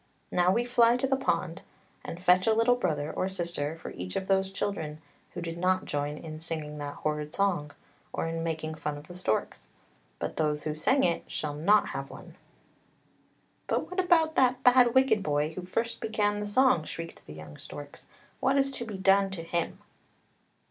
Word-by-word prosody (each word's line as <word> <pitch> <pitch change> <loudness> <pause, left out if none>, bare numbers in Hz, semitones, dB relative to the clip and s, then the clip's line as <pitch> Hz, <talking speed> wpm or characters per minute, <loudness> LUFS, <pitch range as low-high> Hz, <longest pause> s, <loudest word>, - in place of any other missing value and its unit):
Now 180 0 +3
we 235 +5 +1
fly 240 -1 +4
to 250 - 0
the 270 0 +2
pond 185 -10 -1 0.4
and 170 - -6
fetch 185 +1 +4
a 220 - +4
little 230 +2 +4
brother 155 -9 -1
or 185 - -1
sister 170 -4 -3
for - - -7
each 90 +1 -6
of 190 - -1
those 190 0 +1
children 165 -7 -3 0.4
who 175 - -4
did 165 0 -5
not 185 +1 +2
join 145 +1 -2
in 155 -1 -8
singing 155 -2 -5
that 145 0 -5
horrid 150 0 -3
song, 185 -7 +1 0.4
or - - -2
in 165 0 -3
making 160 -1 -3
fun 150 -1 -4
of 145 +1 -12
the - - -10
storks. 180 -12 -2 0.5
But - - -4
those 150 -2 0
who 155 - -2
sang 215 - +2
it 170 - 0
shall 150 -1 -3
not 185 +9 +3
have - - -5
one." - - -12 0.7
" - - -39
But - - -1
what 365 - -2
about 330 -3 +4
that 255 0 +3
bad 250 -1 +6
wicked 260 -5 +4
boy 150 -1 0
who 185 - -5
first 230 +6 -3
began 205 -1 0
the 210 - -3
song!" 235 -5 +4
shrieked 165 +1 -8
the 75 - -8
young 75 -1 -10
storks; 145 0 -10 0.3
"what 270 +1 +2
is 275 0 +2
to 240 -3 -5
be 210 -4 -6
done 195 +1 +4
to 185 -4 -5
him? 170 0 -2
180 Hz, 195 wpm, -29 LUFS, 155-220 Hz, 0.7 s, bad